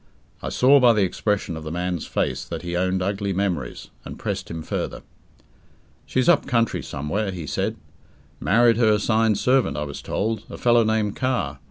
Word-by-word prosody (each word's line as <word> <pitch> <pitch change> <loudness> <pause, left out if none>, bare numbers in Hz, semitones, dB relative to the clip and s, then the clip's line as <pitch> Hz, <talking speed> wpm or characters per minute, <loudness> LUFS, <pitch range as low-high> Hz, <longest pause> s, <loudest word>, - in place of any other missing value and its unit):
I - - -3
saw 140 +3 +5
by 125 -3 +6
the 105 -2 +2
expression 95 -1 -1
of 80 - -7
the 80 - -5
man's 90 -1 -3
face - - -1
that - - -6
he 85 0 -3
owned 95 +1 0
ugly 100 0 -1
memories, 90 -10 -3
and - - -8
pressed - - -4
him 80 -1 -5
further. - - -4 1.0
"She's 130 -1 0
up 165 -4 +4
country 115 -3 +1
somewhere," 95 +9 -3
he 90 -4 -5
said. - - -2 0.6
"Married 115 +7 +4
her 115 -2 +4
assigned 110 0 +2
servant, 130 +3 +2
I 75 - -1
was 70 -1 -6
told, 110 0 -2
a - - -7
fellow 120 -1 +4
named 110 -2 0
Carr. 125 - -1
100 Hz, 180 wpm, -23 LUFS, 90-115 Hz, 1.0 s, by